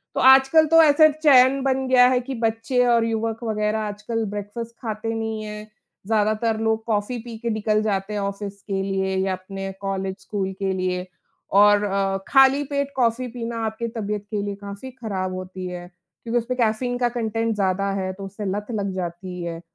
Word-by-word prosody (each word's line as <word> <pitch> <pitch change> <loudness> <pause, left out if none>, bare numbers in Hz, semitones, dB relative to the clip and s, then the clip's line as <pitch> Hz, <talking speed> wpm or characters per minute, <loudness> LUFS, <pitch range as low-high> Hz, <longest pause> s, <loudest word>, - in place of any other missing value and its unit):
तो - - 0
आजकल 270 +4 +7
तो 330 +1 +7
ऐसे 310 +1 +7 0.2
चयन 265 -1 +6
बन 265 -1 0
गया 250 -1 +6
है 255 -1 +2
कि 265 +2 -6
बच्चे 230 +2 0
और 235 -1 +3
युवक 225 +1 -2
वगैरह 215 -1 0
आजकल 215 +2 -3
ब्रेकफ़ास्ट 210 +3 -6
खाते 225 0 -3
नहीं 220 -1 -3
हैं, 210 0 -7 0.4
ज़्यादातर 220 +1 +1
लोग 220 0 0
कॉफ़ी 220 +2 -1
पी 230 -1 -8
के 235 +1 -3
निकल 215 -1 +1
जाते 200 -1 -1
हैं, 210 - -1
ऑफ़िस 200 0 -5
के 195 -2 -3
लिए 190 -1 -1
या 190 0 0
अपने 195 +1 -6
कॉलेज-स्कूल 195 0 -3
के 190 -1 0
लिए, 185 0 -2 0.5
और 205 +1 +6
अ, 195 -1 0
खाली 270 +1 +5
पेट 280 0 -2
कॉफ़ी 250 0 +1
पीना 235 -1 -5
आपकी 220 +2 -3
तबीयत 210 -1 -3
के 210 - -1
लिए 200 0 -3
काफ़ी 200 +6 -8
खराब 195 -7 -4
होती 185 0 -6
है। 175 0 -7 0.4
क्योंकि 235 +1 -1
उसमें 250 +2 -4
कैफ़ीन 240 +2 +1
का 245 -1 +1
कंटेंट 225 -1 -1
ज़्यादा 195 0 0
है, 185 0 -2
तो 195 +1 -8
उससे 200 +2 -7
लत 205 +2 -3
लग 200 -3 -2
जाती 180 0 -5
है, 165 -1 -5
215 Hz, 185 wpm, -23 LUFS, 195-235 Hz, 0.5 s, आजकल